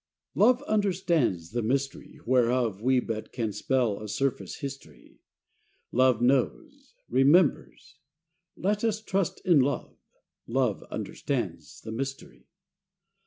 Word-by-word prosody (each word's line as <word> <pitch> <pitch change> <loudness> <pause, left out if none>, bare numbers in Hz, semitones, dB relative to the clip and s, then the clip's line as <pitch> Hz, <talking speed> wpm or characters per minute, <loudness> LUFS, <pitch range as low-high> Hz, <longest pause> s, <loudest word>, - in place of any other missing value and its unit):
T - - -2
OVE 255 +2 +5
understands 175 - 0
the 120 +1 -1
mystery, 135 +5 -2
whereof 120 -4 +2
We 130 +2 +3
can - - -12 0.4
but - - -7
spell 115 -1 0
a 110 - -6
surface 130 +6 -2
history: 140 -1 -9 0.7
Love 125 -2 +3
knows, 140 - 0
remembers: 140 -2 +2 0.6
let 205 +3 0
us 220 -2 +1
trust 195 -4 -2
in 175 -5 +5
Love: 140 +2 -1 0.5
Love 125 -3 0
understands - - -4
the 110 - -7
mystery. 135 +4 -6
135 Hz, 115 wpm, -27 LUFS, 120-175 Hz, 0.7 s, OVE